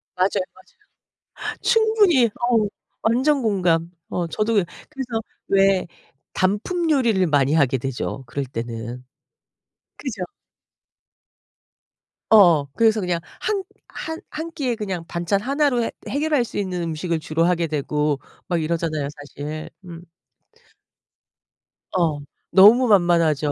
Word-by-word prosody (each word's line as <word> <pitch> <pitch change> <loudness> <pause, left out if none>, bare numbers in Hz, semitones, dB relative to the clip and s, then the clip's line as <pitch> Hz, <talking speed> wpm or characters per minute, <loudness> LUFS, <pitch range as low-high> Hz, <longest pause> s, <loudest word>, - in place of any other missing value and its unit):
맞아요, 185 +1 +1
맞아요. 185 - -24 0.7
충분히. 435 - +4
어 225 -1 +1 0.3
완전 265 +5 +2
공감. 175 -6 +1 0.2
어 175 -1 -2
저도 215 +6 -1
그래서 230 - -3 0.3
왜 195 -2 +3 0.5
단품요리를 235 - +1
많이 145 -1 +2
하게 135 -4 +3
되죠 135 +1 -4
그럴 140 +3 -3
때는. 115 0 -6 0.9
그죠? 230 -10 -5 2.1
어. 175 -9 +6
그래서 225 -1 +3
그냥 180 -3 -1 0.2
한 405 -3 -1 0.3
한 320 +1 -6
한 320 +2 -5
끼에 265 -7 -2
그냥 190 -6 -4
반찬 175 +3 -1
하나로 275 -2 +1
해 - - -2 0.2
해결할 290 -2 +1
수 - - -7
있는 180 -3 -2
음식을 165 +1 -2
주로 160 +2 0
하게 175 -1 +2
되고 150 -1 -1 0.3
막 175 -3 0
이러잖아요 155 -3 -1
사실. 145 +2 -7 0.2
음. 170 -1 -9 1.9
어. 160 -5 +1 0.3
너무 225 +6 +7
만만하죠. 170 -7 +3
185 Hz, 225 characters per minute, -22 LUFS, 160-240 Hz, 2.1 s, 너무